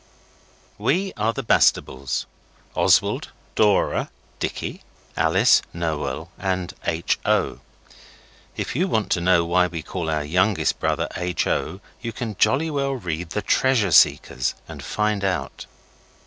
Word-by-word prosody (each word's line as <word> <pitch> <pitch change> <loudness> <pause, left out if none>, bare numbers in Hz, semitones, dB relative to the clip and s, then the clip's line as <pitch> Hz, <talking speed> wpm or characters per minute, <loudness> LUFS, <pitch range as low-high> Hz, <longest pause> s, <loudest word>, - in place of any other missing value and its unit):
We 180 - 0
are 110 +1 +1
the 135 +3 -5
Bastables 65 - +2 0.5
Oswald, - - +2 0.2
Dora, 105 +1 +2 0.3
Dicky, - - -4 0.3
Alice, - - +4
Noel, 80 -3 -3
and 95 -2 -2
H. 85 0 0
O. - - +1 1.0
If - - -3
you 180 +7 +1
want 110 - -1
to 85 - +2
know 85 -1 +3
why 90 +1 +3
we 85 -2 -6
call 85 -2 -4
our 75 -1 0
youngest 90 +6 +1
brother - - 0
H. 90 -1 -1
O. 95 - -2 0.2
you 120 -1 -4
can 110 -2 -5
jolly 140 +9 +3
well 140 -1 0
read 90 -8 -4
The 105 +3 -3
Treasure 115 -4 +2
Seekers 65 -3 +3
and - - -9
find 105 -1 -1
out. 95 -1 -2
95 Hz, 135 wpm, -23 LUFS, 85-115 Hz, 1.0 s, Alice